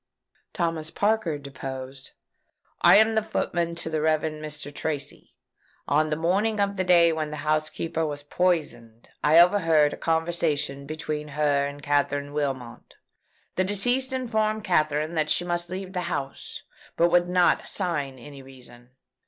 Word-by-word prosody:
Thomas 165 -3 -2
Parker 205 -5 0
deposed: 135 -1 -8 0.7
"I - - +7
am 220 +1 +5
footman 170 -5 -2
to 170 - -5
the 160 -1 -1
Rev. 155 0 +2
Mr. 150 -2 -6
Tracy. 145 -1 -5 0.5
On 155 +2 +2
the 150 - 0
morning 200 +7 0
of 200 0 +1
the 185 - 0
day 170 -2 +5
when 155 -1 -3
the 150 0 -7
housekeeper 155 +1 -1
was 145 -2 -4
poisoned, 145 -9 -2
I 155 +2 +5
overheard 165 -5 +5
a - - -7
conversation 160 -4 -1
between 155 -1 -4
her 145 -2 +2
and 145 0 -9
Katherine 145 0 0
Wilmot. 135 -5 -4 0.6
The 185 - +3
deceased 245 +7 +1
informed 220 -4 -1
Katherine 155 -4 +1
that 155 -2 0
she 175 - +1
must 175 0 -2
leave 190 +1 -6
the 180 - -2
house, 140 -5 -5 0.3
but 170 +1 +3
would 175 0 +3
not 180 -1 +3
assign 150 -8 -2
any 140 +2 -11
reason. 125 -2 -14
155 Hz, 145 wpm, -25 LUFS, 145-180 Hz, 0.7 s, I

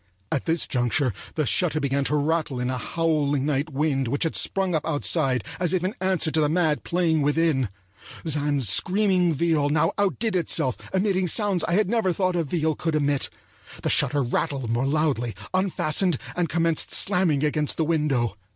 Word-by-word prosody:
At 135 - -1
this 165 0 0
juncture 125 0 0 0.2
the 155 - 0
shutter 155 +1 0
began 140 -1 0
to 150 - 0
rattle 150 -2 -1
in 125 +1 -1
a 130 - -2
howling 145 -2 0
night 145 +1 -1
wind 135 -2 0
which 140 +7 -1
had 165 - -1
sprung 190 -2 0
up 155 - 0
outside 145 - +1 0.2
as 180 -1 0
if 180 -2 0
in 185 +3 -1
answer 185 -4 +1
to 155 - +1
the 150 - +2
mad 160 -2 +1
playing 170 -3 +1
within. 145 -4 +1 0.6
Zann's 145 -4 +2
screaming 185 - +2
viol 155 -1 +1
now 150 +1 +2
outdid 205 - 0
itself 145 -7 +1 0.2
emitting 190 -1 +1
sounds 195 -1 +1
I 170 - -1
had 210 +2 +2
never 220 -3 +1
thought 185 0 0
a 170 - +1
viol 160 0 -1
could 160 +1 -2
emit. 145 -2 +1 0.5
The - - +1
shutter 145 -1 +2
rattled 125 0 -2
more 120 +3 0
loudly, 140 -6 0 0.2
unfastened, 185 -3 +1 0.2
and 175 -2 -1
commenced 165 -1 +1
slamming 180 -8 +1
against 150 0 0
the 160 - +1
window. 145 -9 0
155 Hz, 180 wpm, -24 LUFS, 140-175 Hz, 0.6 s, the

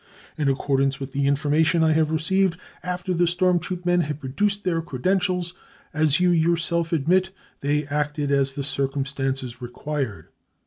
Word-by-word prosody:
In 145 -2 +1
accordance 135 0 +1
with 135 0 -6
the 140 0 0
information 155 +4 +2
I 160 - +4
have 155 0 +2
received, 175 +3 +1 0.2
after 180 +1 -3
the 175 0 +2
storm 175 +1 +2
troop 180 +1 -5
men 175 0 +3
had 150 -2 -3
produced 200 +10 -1
their 170 -3 0
credentials, 180 +4 0 0.4
as 155 0 +2
you 180 0 +4
yourself 170 0 +1
admit, 175 +4 +2 0.3
they 145 +1 0
acted 145 0 -1
as 135 -1 +2
the 140 - -3
circumstances 135 -2 -2
re 120 - -5
quired. 130 - -4
155 Hz, 160 wpm, -24 LUFS, 140-175 Hz, 0.4 s, I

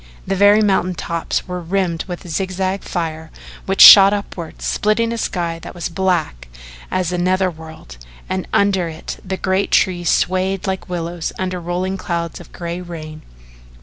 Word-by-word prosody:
The 195 - -1
very 205 +2 +5
mountain 190 -3 +1
tops 170 +2 -3
were 180 -1 -4
rimmed 175 -1 -1
with 180 -1 -7
zigzag 185 +3 -2
fire, 160 -2 -4 0.4
which 195 0 +1
shot 195 0 +11
upward, 185 -5 -6
splitting 225 +2 0
a - - -4
sky 170 -5 -2
that - - -10
was 175 -1 -4
as - - -16
black 170 - -1 0.4
as 180 -2 -1
a 180 - -2
nether 185 +1 +1
world, 160 - -12 0.3
and 185 0 -3
under 190 -4 +2
it 160 0 -8
the 190 0 -4
great 190 +1 0
trees 175 -2 +2
swayed 185 +1 0
like 190 -1 -3
willows 170 -1 -4
under 185 -1 -3
rolling 180 +2 -3
clouds 170 -3 -4
of - - -14
gray 170 +1 -5
rain. 155 -3 -8
180 Hz, 165 wpm, -19 LUFS, 170-190 Hz, 0.4 s, shot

